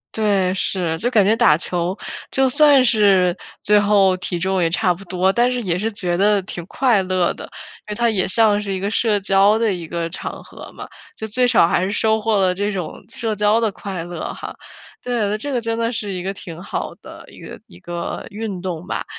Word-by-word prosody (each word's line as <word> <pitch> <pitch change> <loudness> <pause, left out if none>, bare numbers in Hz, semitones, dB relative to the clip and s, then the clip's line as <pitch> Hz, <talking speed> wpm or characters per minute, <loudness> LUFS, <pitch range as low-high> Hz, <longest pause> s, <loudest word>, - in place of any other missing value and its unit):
对， 200 -4 +1
是， 175 -4 -1
就 245 +8 -1
感 210 -5 +4
觉 215 +3 +3
打 225 -10 +4
球 175 +2 -1 0.4
就 265 -1 +2
算 285 -1 +5
是 200 -7 +3 0.3
最 210 0 +4
后 200 -2 +4
体 180 -1 -4
重 190 +1 0
也 165 - +2
差 180 +1 +1
不 190 +3 -12
多， 185 +1 +1
但 245 +1 +2
是 250 -1 -2
也 180 -5 -1
是 220 +4 -2
觉 180 -4 -2
得 200 +2 +3
挺 175 -2 -7
快 235 -8 +2
乐 185 -1 0
的。 - - -10 0.5
因 - - -4
为 - - -3
它 235 +1 +2
也 195 -4 +1
像 210 0 +3
是 200 -2 -3
一 190 - -2
个 200 - -2
社 210 0 +1
交 195 +2 +3
的 220 -4 +1
一 175 -2 -6
个 170 0 -3
场 - - -6
合 - - -12
嘛， - - -9 0.3
就 220 - -5
最 250 +4 +1
少 235 -8 +4
还 180 - +1
是 195 - -1
收 220 +1 +1
获 220 -1 +1
了 185 -1 +2
这 205 +2 -1
种 180 -4 -6
社 220 -2 -3
交 210 +2 +3
的 225 -2 +1
快 185 -4 -6
乐 175 -2 -5
哈。 - - -8 0.5
对， 215 -4 -1
这 285 +6 -5
个 245 -3 -1
真 230 0 -2
的 230 +1 0
是 210 -4 -4
一 180 -1 -4
个 195 +1 -3
挺 170 -4 -9
好 - - -4
的 - - -13
一 - - -15
个 - - -10
一 85 - -16
个 170 - -5
运 205 -3 -5
动 180 -2 -5
吧。 - - -3
200 Hz, 245 characters per minute, -20 LUFS, 180-220 Hz, 0.5 s, 算